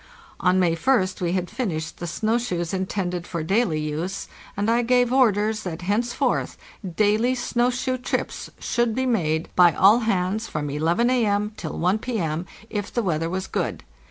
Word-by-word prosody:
On 185 Hz, 0 st, +3 dB
May 175 Hz, -3 st, +3 dB
Ist 185 Hz, +1 st, +1 dB
we 175 Hz, -1 st, 0 dB
had 180 Hz, -1 st, -1 dB
finished 160 Hz, -9 st, -3 dB
the 175 Hz, -, -4 dB
snow 220 Hz, +7 st, 0 dB
shoes 175 Hz, -8 st, -3 dB
intended 185 Hz, -2 st, -2 dB
for 170 Hz, -2 st, -3 dB
daily 190 Hz, -2 st, +1 dB
use, 155 Hz, +6 st, -3 dB, 0.3 s
and 205 Hz, +1 st, 0 dB
I 235 Hz, +1 st, +3 dB
gave 245 Hz, 0 st, +2 dB
orders 220 Hz, -4 st, +3 dB
that, 175 Hz, -1 st, -6 dB
henceforth, 225 Hz, +6 st, 0 dB, 0.4 s
daily 215 Hz, +5 st, +3 dB
snow 245 Hz, 0 st, +1 dB
shoe 255 Hz, +1 st, -2 dB
trips 250 Hz, -, -3 dB
should 240 Hz, -2 st, 0 dB
be 260 Hz, +1 st, 0 dB
made 165 Hz, -10 st, 0 dB
by 175 Hz, -2 st, +6 dB
all 205 Hz, +9 st, +6 dB
hands 210 Hz, -1 st, 0 dB
from 145 Hz, -1 st, -3 dB
11 170 Hz, -, +1 dB
A.M. 210 Hz, -4 st, +1 dB
till 160 Hz, -, -6 dB
1 185 Hz, +5 st, +1 dB
P.M., 175 Hz, -9 st, -2 dB, 0.2 s
if 205 Hz, -2 st, -3 dB
the 235 Hz, -, -1 dB
weather 165 Hz, -3 st, 0 dB
was 185 Hz, +1 st, -3 dB
good. -, -, -3 dB
195 Hz, 170 wpm, -24 LUFS, 175-235 Hz, 0.4 s, by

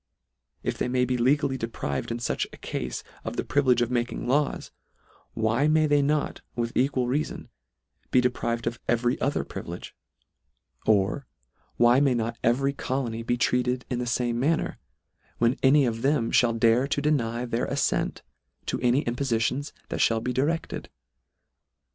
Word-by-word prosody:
If -, -, -2 dB
they -, -, 0 dB
may 125 Hz, 0 st, +2 dB
be 125 Hz, 0 st, 0 dB
legally 135 Hz, +2 st, +2 dB
deprived 70 Hz, -, -3 dB
in 115 Hz, -, -2 dB
fuch 120 Hz, -, -1 dB
a -, -, -12 dB
cafe 65 Hz, -1 st, -4 dB, 0.2 s
of -, -, -5 dB
the -, -, 0 dB
privilege 130 Hz, -4 st, +3 dB
of 120 Hz, -, -3 dB
making 120 Hz, 0 st, -1 dB
laws, 140 Hz, +3 st, 0 dB, 0.6 s
why 115 Hz, +6 st, +2 dB
may 155 Hz, 0 st, +4 dB
they 145 Hz, -1 st, +3 dB
not, 150 Hz, +1 st, 0 dB
with 120 Hz, -1 st, -2 dB
equal 130 Hz, -1 st, +2 dB
reafon, 140 Hz, +5 st, -2 dB, 0.6 s
be 125 Hz, -, +4 dB
deprived 120 Hz, -2 st, -1 dB
of 115 Hz, 0 st, -2 dB
every 120 Hz, +1 st, +1 dB
other 140 Hz, -, 0 dB
privilege? -, -, -7 dB, 0.9 s
Or 110 Hz, +6 st, +2 dB, 0.5 s
why 120 Hz, +2 st, +5 dB
may 140 Hz, -3 st, +3 dB
not 115 Hz, 0 st, -2 dB
every 135 Hz, +4 st, +2 dB
colony 130 Hz, -4 st, -2 dB
be 120 Hz, +1 st, -1 dB
treated 125 Hz, +1 st, +1 dB
in 125 Hz, -, 0 dB
the 125 Hz, -, -2 dB
fame 120 Hz, -1 st, 0 dB
manner, 155 Hz, +6 st, 0 dB, 0.6 s
when 120 Hz, +2 st, +3 dB
any 140 Hz, +1 st, +5 dB
of 115 Hz, -1 st, -2 dB
them 135 Hz, -3 st, +1 dB
(hall 120 Hz, -1 st, +4 dB
dare 115 Hz, +3 st, +3 dB
to 145 Hz, -, 0 dB
deny 125 Hz, -5 st, 0 dB
their 120 Hz, 0 st, -1 dB
afTent -, -, 0 dB, 0.4 s
to -, -, -2 dB
any 125 Hz, +3 st, +3 dB
impofitions 125 Hz, +2 st, -1 dB, 0.2 s
that -, -, -3 dB
fhall 115 Hz, -1 st, +2 dB
be 125 Hz, -, -1 dB
di 130 Hz, -, +1 dB
recled 165 Hz, +3 st, -2 dB
125 Hz, 160 wpm, -26 LUFS, 115-140 Hz, 0.9 s, why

